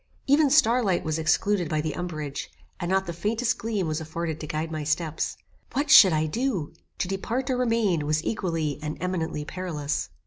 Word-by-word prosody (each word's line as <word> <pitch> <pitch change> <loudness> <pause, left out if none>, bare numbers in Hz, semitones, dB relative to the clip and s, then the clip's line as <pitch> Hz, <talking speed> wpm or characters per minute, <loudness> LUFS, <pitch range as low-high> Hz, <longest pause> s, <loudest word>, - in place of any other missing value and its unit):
Even 285 +1 +4
star 255 -4 +5
light 190 -4 +1
was 155 0 -1
excluded 170 +3 +1
by 155 - 0
the 155 -1 -2
umbrage, 155 -5 -4 0.3
and 175 - -3
not 190 0 +2
the 170 - -4
faintest 220 +7 -1
gleam 210 -5 -1
was 155 +1 -2
afforded 160 0 -4
to 155 - -6
guide 155 +2 -3
my 155 -1 -3
steps. 155 +1 -1 0.4
What 285 +1 0
should 190 - +10
I 155 0 +1
do? 200 - -2 0.2
To - - -1
depart 235 +8 -2
or 255 - 0
remain 225 -11 +1
was 155 +1 +1
equally 165 -9 -1
and 150 0 -4
eminently 165 -4 -2
perilous. 155 -5 -3
170 Hz, 185 wpm, -26 LUFS, 155-215 Hz, 0.4 s, should